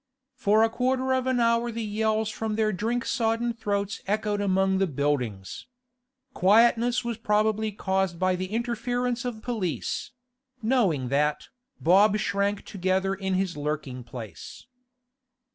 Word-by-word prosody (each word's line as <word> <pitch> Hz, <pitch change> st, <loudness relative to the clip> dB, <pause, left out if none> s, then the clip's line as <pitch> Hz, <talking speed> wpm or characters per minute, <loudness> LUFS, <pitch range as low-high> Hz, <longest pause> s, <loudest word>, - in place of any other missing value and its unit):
For 220 Hz, -4 st, +3 dB
a 225 Hz, -, +3 dB
quarter 260 Hz, +2 st, 0 dB
of 260 Hz, 0 st, 0 dB
an 260 Hz, -1 st, +1 dB
hour 235 Hz, 0 st, +2 dB
the 230 Hz, 0 st, -4 dB
yells 215 Hz, +1 st, 0 dB
from 220 Hz, -1 st, -3 dB
their 215 Hz, -1 st, +1 dB
drink 230 Hz, +5 st, -1 dB
sodden 235 Hz, -1 st, 0 dB
throats 200 Hz, -3 st, -2 dB
echoed 210 Hz, 0 st, 0 dB
among 190 Hz, -1 st, +2 dB
the 195 Hz, -, +2 dB
buildings. 130 Hz, -, -2 dB, 0.7 s
Quietness 235 Hz, +5 st, +4 dB
was 235 Hz, -2 st, -3 dB
probably 215 Hz, 0 st, +1 dB
caused 190 Hz, -3 st, -1 dB
by 185 Hz, +1 st, +1 dB
the 185 Hz, +1 st, -3 dB
interference 240 Hz, +3 st, -2 dB
of 225 Hz, -3 st, -5 dB
police; 215 Hz, -10 st, -3 dB, 0.5 s
knowing 210 Hz, -, +1 dB
that, 150 Hz, +2 st, 0 dB, 0.3 s
Bob 195 Hz, +5 st, +5 dB
shrank 200 Hz, +1 st, -1 dB
together 190 Hz, 0 st, 0 dB
in 190 Hz, -1 st, -2 dB
his 185 Hz, -1 st, -1 dB
lurking 145 Hz, -4 st, -4 dB
place. 115 Hz, -, -9 dB
210 Hz, 135 wpm, -26 LUFS, 185-230 Hz, 0.7 s, Bob